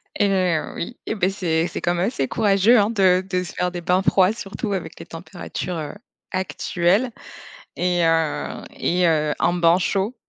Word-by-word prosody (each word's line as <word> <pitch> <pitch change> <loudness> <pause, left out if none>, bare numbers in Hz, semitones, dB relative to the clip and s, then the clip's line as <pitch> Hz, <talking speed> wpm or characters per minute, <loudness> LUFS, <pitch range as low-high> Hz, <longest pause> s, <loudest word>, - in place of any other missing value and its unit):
Eh 205 - +2
heu, 180 -5 0
oui. 240 +8 -5
Eh - - -2
beh, 190 -3 +1
c'est 170 -4 0
c'est 175 - -6
quand 175 - +1
même 175 +3 +1
assez 140 - -1
courageux 210 - +4
hein 205 +1 +2
de 190 -4 +3
de 180 -1 0
se 180 - -9
faire 180 0 -1
des 175 -1 -5
bains 180 +2 +2
froids 190 0 +3
surtout 205 0 -5
avec 170 -4 -5
les - - -9
températures, 175 +1 -6
heu, 150 +1 -5 0.4
actuelles 185 +4 0 0.7
et 180 -1 +1
heu, 165 -2 0
et 180 +1 +1
heu, 155 -2 +2
un 175 - +2
bain 170 0 +4
chaud? 195 +5 -1
180 Hz, 185 wpm, -22 LUFS, 170-195 Hz, 0.7 s, courageux